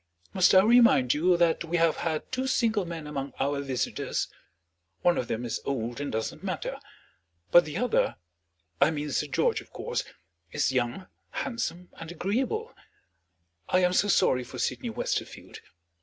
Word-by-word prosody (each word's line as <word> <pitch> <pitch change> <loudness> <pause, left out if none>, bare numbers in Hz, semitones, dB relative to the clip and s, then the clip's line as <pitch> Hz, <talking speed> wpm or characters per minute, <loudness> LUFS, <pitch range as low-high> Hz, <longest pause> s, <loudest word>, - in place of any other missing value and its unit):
Must 190 -1 +5
I 185 - +8
remind 225 - +5
you 175 +4 +3
that 170 -1 +2
we 170 +1 -1
have 165 -1 +3
had 160 -2 -3
two 260 +1 -1
single 225 -6 +1
men 165 -2 -6
among 140 -3 -5
our 140 +1 0
visitors? 135 -3 -2 0.7
One 175 -1 +4
of 120 - -2
them 115 +2 -3
is 120 - -3
old 120 -1 -3
and 145 - -3
doesn't 110 0 -3
matter. - - -4 0.7
But 175 - +7
the 155 +2 -5
other 245 +2 +1 0.7
I 140 - +6
mean 150 -2 -3
Sir - - 0
George, - - +1
of - - -19
course - - -3 0.5
is - - +1
young, 120 -6 -1 0.2
handsome, 180 - -4
and 165 0 -7
agreeable. 255 - -2 1.0
I 185 0 +3
am 180 0 +3
so 205 - +3
sorry 130 -9 +3
for - - -10
Sydney - - -2
Westerfield. - - -4
165 Hz, 160 wpm, -28 LUFS, 140-190 Hz, 1.0 s, I